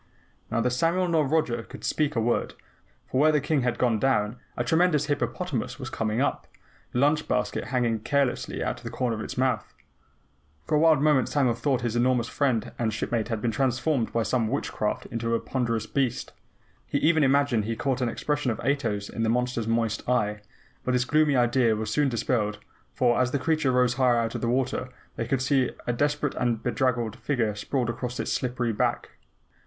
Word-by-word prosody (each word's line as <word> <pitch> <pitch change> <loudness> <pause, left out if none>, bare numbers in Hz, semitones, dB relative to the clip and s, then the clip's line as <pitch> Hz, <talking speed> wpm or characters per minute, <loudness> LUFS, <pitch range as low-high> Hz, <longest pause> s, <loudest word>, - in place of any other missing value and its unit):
Neither 115 +2 +1
Samuel 165 +8 +1
nor 160 -4 +2
Roger 135 -6 +1
could - - -12
speak 150 -1 0
a - - +2
word, 120 +1 0 0.5
for 130 - 0
where 155 +1 +6
the 150 - +3
King 150 0 0
had 125 -1 0
gone 115 -3 +2
down, 120 -3 +1 0.2
a 120 - 0
tremendous 160 0 +2
hippopotamus 145 - -2
was 135 -1 -7
coming 110 +1 -1
up, 140 - -1 0.4
the - - -3
lunch 150 +4 +2
basket 125 0 -1
hanging 120 -3 0
carelessly 140 +2 -1
out - - -2
of - - -17
a - - -3
corner 120 -3 -1
of 110 - -5
its - - -6
mouth. 130 0 0 0.9
For - - -3
a 150 - +5
wild 155 -3 +4
moment 150 -5 +3
Samuel 135 -5 +2
thought 130 +2 0
his 120 -1 -2
enormous 120 -1 +2
friend 130 -4 0
and 115 -2 +1
shipmate 110 +1 -2
had 115 -3 -3
been 120 - +1
transformed 130 +2 0
by 115 - +1
some 115 -1 0
witchcraft 110 -4 -2
into 115 0 -2
this 115 0 +1
ponderous 115 -4 -1
beast. 130 0 -2 0.5
He - - 0
even 160 0 +3
imagined 135 -5 +2
he 115 +1 -2
caught 130 +1 -1
an 125 - +1
expression 145 +2 -1
of 115 - -2
Ato's 115 -7 -1
in 115 - -5
the 110 - +1
monster's 125 -1 0
moist 115 0 -1
eye. 105 -4 +1 0.4
But 125 - 0
this 125 0 +2
gloomy 150 +1 +3
idea 120 -2 +3
was 110 0 -3
soon 145 -2 +2
dispelled, 110 -3 -1 0.3
for, 120 -1 +2
as 125 - +2
the 140 - 0
creature 145 0 +1
rose 125 -1 +3
higher 125 -1 +3
out 115 -1 0
of - - -4
the 115 - 0
water, 130 0 -1 0.3
they 115 - -3
could 130 0 0
see 130 -2 +2 0.2
a 120 - 0
desperate 145 +2 0
and 120 -3 -1
bedraggled 120 -1 0
figure 120 -6 0
sprawled 120 +4 -1
across 125 +1 -5
its - - -2
slippery 125 -2 -1
back. 105 - -1
125 Hz, 200 wpm, -26 LUFS, 115-140 Hz, 0.9 s, where